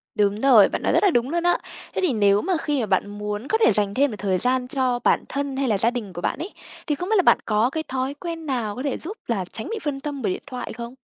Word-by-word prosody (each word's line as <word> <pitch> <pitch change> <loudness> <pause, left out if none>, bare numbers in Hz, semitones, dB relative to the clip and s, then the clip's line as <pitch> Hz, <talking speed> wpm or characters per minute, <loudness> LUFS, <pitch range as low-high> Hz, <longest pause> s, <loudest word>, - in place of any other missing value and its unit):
Đúng 205 -1 +1
rồi, 235 -6 +6
bạn - - -3
nói - - +1
rất - - +3
là 395 - +5
đúng 240 -2 +1
luôn 340 +2 -1
á. 350 0 +3 0.4
Thế - - 0
thì 360 -8 +2
nếu 205 -2 +3
mà 375 - 0
khi 295 -2 0
mà 235 - 0
bạn 195 -1 +1
muốn 210 +3 -4
có 440 - +2
thể - - +6
dành 205 -1 +2
thêm 280 +2 +2
một 210 - -6
thời 190 -2 +1
gian 250 +4 0
cho 255 -2 0
bản - - +3
thân 280 -1 -3
hay 275 -1 0
là 215 -4 +2
gia 225 +4 +2
đình 225 -6 -5
của 175 - -6
bạn - - -1
ấy, 360 +6 -5 0.3
thì 295 - +1
không 355 +6 -5
biết 440 - +3
là 370 - +4
bạn - - +6
có 215 +2 +2
cái 315 +3 -3
thói 260 +1 -2
quen 330 +2 -6
nào 240 -7 -2
có 255 - -5
thể 280 -3 -1
giúp 400 +8 -7
là 200 -6 -1
tránh 220 - -6
bị 450 - -3
phân 285 -2 -2
tâm 285 -1 -5
bởi 200 -5 0
điện - - -7
thoại 255 -3 -6
không? 235 +1 -7
255 Hz, 305 wpm, -23 LUFS, 210-290 Hz, 0.4 s, rồi